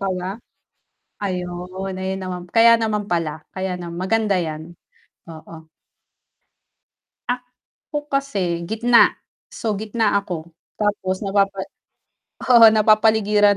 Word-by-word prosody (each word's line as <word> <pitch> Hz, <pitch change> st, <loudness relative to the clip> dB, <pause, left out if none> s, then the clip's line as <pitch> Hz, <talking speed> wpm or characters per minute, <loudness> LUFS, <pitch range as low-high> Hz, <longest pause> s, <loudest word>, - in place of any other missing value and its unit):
ka 195 Hz, -, -1 dB
ba? 185 Hz, -, -4 dB, 0.9 s
Ayun, 185 Hz, 0 st, -5 dB
ayun 190 Hz, 0 st, -3 dB
naman 180 Hz, -1 st, -5 dB
kaya 230 Hz, +4 st, +5 dB
naman 210 Hz, -2 st, -1 dB
pala, 160 Hz, -3 st, -2 dB
kaya 190 Hz, -1 st, -3 dB
naman 170 Hz, -1 st, -7 dB
maganda 200 Hz, 0 st, +1 dB
'yan, 160 Hz, 0 st, -5 dB, 0.6 s
oo. 160 Hz, 0 st, -12 dB, 2.1 s
Ako 295 Hz, -1 st, -7 dB
kasi, 195 Hz, -12 st, -1 dB
gitna. 230 Hz, +4 st, +4 dB, 0.4 s
So, 220 Hz, -2 st, -2 dB
gitna 215 Hz, -1 st, 0 dB
ako, 170 Hz, -5 st, -7 dB, 0.2 s
tapos 200 Hz, -2 st, -1 dB
napapa 195 Hz, 0 st, +1 dB, 0.9 s
oo, 230 Hz, -2 st, +9 dB
napapaligiran 215 Hz, -1 st, +4 dB
195 Hz, 100 wpm, -21 LUFS, 180-220 Hz, 2.1 s, oo